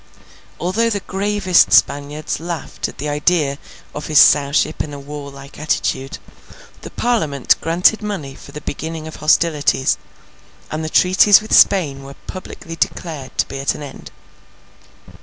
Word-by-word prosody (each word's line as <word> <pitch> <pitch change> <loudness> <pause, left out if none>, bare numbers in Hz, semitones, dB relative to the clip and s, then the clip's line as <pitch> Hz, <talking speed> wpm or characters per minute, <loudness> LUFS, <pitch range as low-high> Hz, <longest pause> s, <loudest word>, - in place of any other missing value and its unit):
Although 210 +7 0
the 205 -3 -2
gravest 190 - +2
Spaniards 145 - +1
laughed 170 0 -5
at - - -12
the 150 - -4
idea 150 -1 0 0.3
of 150 0 -6
his 155 - +1
Sowship 145 +2 +4
in 145 -2 -8
a - - -8
warlike 140 -1 -10
attitude, 135 -3 -2 0.6
the - - -8
Parliament 155 - +1
granted 175 +7 +2
money 195 -10 -5
for 140 - -14
the 150 - -8
beginning 160 +2 -6
of 160 - -9
hostilities, 150 -3 +2 0.7
and 155 +1 -3
the 155 - -3
treaties 185 +4 +5
with 215 0 -6
Spain 150 -9 +4
were 135 0 -11
publicly 180 -3 -8
declared 155 -5 -4
to - - +1
be 135 - -7
at 135 - -1
an 150 - -8
end. 140 -2 -10
155 Hz, 145 wpm, -18 LUFS, 140-180 Hz, 0.7 s, treaties